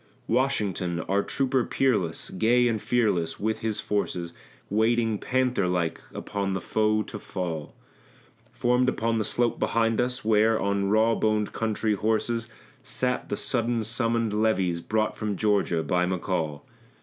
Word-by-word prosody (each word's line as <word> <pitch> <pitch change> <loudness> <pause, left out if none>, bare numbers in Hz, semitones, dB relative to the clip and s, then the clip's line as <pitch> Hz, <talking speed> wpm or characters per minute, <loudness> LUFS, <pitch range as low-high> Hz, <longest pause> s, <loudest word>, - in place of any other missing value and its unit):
Washington, 100 -10 0
our 100 +4 +1
trooper 130 +2 0
peerless, 105 -14 0
gay 120 +5 +3
and 110 -3 -1
fearless, 105 -9 0
with 110 +1 -1
his 110 -2 -2
forces 90 -4 -2 0.3
Waiting 110 0 +1
panther 125 -6 +1
like 85 -2 -1
upon 100 -2 -3
the 95 - -1
foe 110 +1 +1
to 105 - -8
fall, 85 -7 -5 0.8
Formed 125 +1 +2
upon 115 -1 0
the - - +1
slope 120 +2 0
behind 115 0 +2
us, 125 -2 -3
where, 110 0 +4
on 100 0 0
raw 110 +2 +4
boned 110 -2 +1
country 110 -1 0
horses, 110 +2 0 0.3
Sat - - -2
the - - -2
sudden 115 0 -1
summoned 115 -1 0
levies 95 -6 +1
brought 110 +3 0
from 105 -2 -3
Georgia 100 -6 +1
by 90 +1 +1
McCall. 85 -5 -2
110 Hz, 140 wpm, -26 LUFS, 95-115 Hz, 0.8 s, where